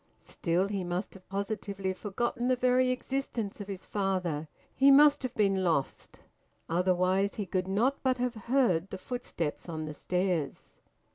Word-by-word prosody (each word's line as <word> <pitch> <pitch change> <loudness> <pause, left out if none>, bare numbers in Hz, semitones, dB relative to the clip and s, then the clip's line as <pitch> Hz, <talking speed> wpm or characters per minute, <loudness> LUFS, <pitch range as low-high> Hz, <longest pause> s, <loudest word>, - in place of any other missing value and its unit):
Still, 175 +3 0
he 200 -2 -2
must 175 +2 -3
have 190 -1 -16
positively 200 -1 -3
forgotten 240 +5 -2
the 255 - +3
very 255 +1 +3
existence 255 -5 -3
of 200 - -7
his 195 -2 -7
father; 185 -6 -1 0.3
he 270 +1 +5
must 290 +1 +7
have 255 -2 -4
been 200 -2 +3
`lost,' 165 -7 -1 0.5
otherwise 185 +3 +2
he 205 - -3
could 185 0 -1
not 230 +9 +1
but 260 -1 +1
have 250 -1 -1
heard 220 -6 +1
the 190 - -5
footsteps 185 -9 -4
on 155 -1 -4
the 155 - -5
stairs. 180 -1 -2
195 Hz, 155 wpm, -30 LUFS, 180-245 Hz, 0.5 s, must